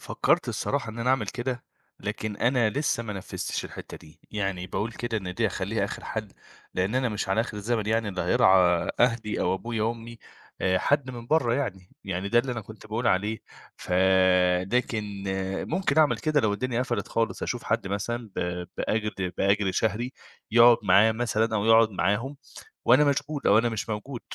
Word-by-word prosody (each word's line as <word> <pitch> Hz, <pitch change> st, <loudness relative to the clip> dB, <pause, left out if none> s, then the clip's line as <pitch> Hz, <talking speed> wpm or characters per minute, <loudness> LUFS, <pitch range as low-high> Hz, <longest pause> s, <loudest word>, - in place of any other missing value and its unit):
فكرت -, -, +1 dB
الصراحة 110 Hz, -, -2 dB
إن 115 Hz, -, -9 dB
أنا 125 Hz, +2 st, +1 dB
أعمل 125 Hz, -6 st, +1 dB
كده، 120 Hz, 0 st, -4 dB, 0.4 s
لكن 105 Hz, 0 st, -4 dB
أنا 120 Hz, -3 st, +2 dB
لسه 140 Hz, -3 st, -1 dB
ما 105 Hz, -2 st, -5 dB
نفذتش 95 Hz, -2 st, -4 dB
الحتة -, -, -9 dB
دي 80 Hz, +2 st, -17 dB
يعني 95 Hz, -3 st, -2 dB
باقول 110 Hz, +5 st, -3 dB
كده 120 Hz, -1 st, -3 dB
إن 90 Hz, -2 st, -6 dB
دي 115 Hz, +3 st, +1 dB
أخليها 100 Hz, +2 st, -2 dB
آخر -, -, -6 dB
حل 110 Hz, -2 st, -4 dB, 0.5 s
لأن 95 Hz, +5 st, 0 dB
أنا 130 Hz, -1 st, +1 dB
مش 105 Hz, -2 st, -3 dB
على 95 Hz, +4 st, +2 dB
آخر 115 Hz, -2 st, -4 dB
الزمن 110 Hz, +1 st, -1 dB
يعني 110 Hz, -1 st, +1 dB
اللي 95 Hz, -3 st, -3 dB
هيرعى 90 Hz, -, +4 dB
آآ 90 Hz, -1 st, +2 dB
أهلي 115 Hz, -3 st, +1 dB
أو 90 Hz, +1 st, +1 dB
أبويا 115 Hz, +2 st, -1 dB
أمي 115 Hz, 0 st, -9 dB, 0.4 s
آآ 95 Hz, 0 st, +2 dB
حد 140 Hz, -3 st, +1 dB
من 120 Hz, -1 st, -8 dB
برّا 125 Hz, -6 st, +2 dB
يعني، 95 Hz, -10 st, -3 dB
يعني 95 Hz, +1 st, -3 dB
ده 120 Hz, -, +4 dB
اللي 125 Hz, +1 st, 0 dB
أنا 115 Hz, -, -4 dB
كنت 110 Hz, +1 st, -12 dB
باقول 110 Hz, +3 st, -2 dB
عليه 105 Hz, +4 st, +1 dB, 0.4 s
فده 95 Hz, +3 st, +3 dB
كان 105 Hz, -5 st, -5 dB, 0.5 s
ممكن 180 Hz, -2 st, +1 dB
أعمل 155 Hz, -2 st, +4 dB
كده 155 Hz, -2 st, +1 dB
لو 105 Hz, -3 st, +1 dB
الدنيا 125 Hz, +2 st, -1 dB
قفلت 125 Hz, -2 st, -3 dB
خالص 115 Hz, -1 st, -1 dB
أشوف 120 Hz, -, -3 dB
حد 115 Hz, -2 st, 0 dB
مثلًا 110 Hz, +3 st, -3 dB
ب 90 Hz, 0 st, -2 dB
بأجر 105 Hz, -4 st, -2 dB
بأجر 100 Hz, 0 st, +2 dB
شهري 115 Hz, +4 st, -1 dB, 0.4 s
يقعد 120 Hz, +1 st, +7 dB
معاه 100 Hz, +3 st, +5 dB
مثلًا 110 Hz, -1 st, 0 dB
أو 100 Hz, -, -1 dB
يقعد 115 Hz, 0 st, +6 dB
معاهم 115 Hz, +8 st, -1 dB, 0.5 s
وأنا 130 Hz, +5 st, +6 dB
مشغول 145 Hz, +1 st, -1 dB
أو 105 Hz, -, +6 dB
أنا 120 Hz, +1 st, +2 dB
مش 110 Hz, -1 st, -4 dB
موجود، 115 Hz, +4 st, -5 dB
110 Hz, 185 wpm, -26 LUFS, 100-120 Hz, 0.5 s, يقعد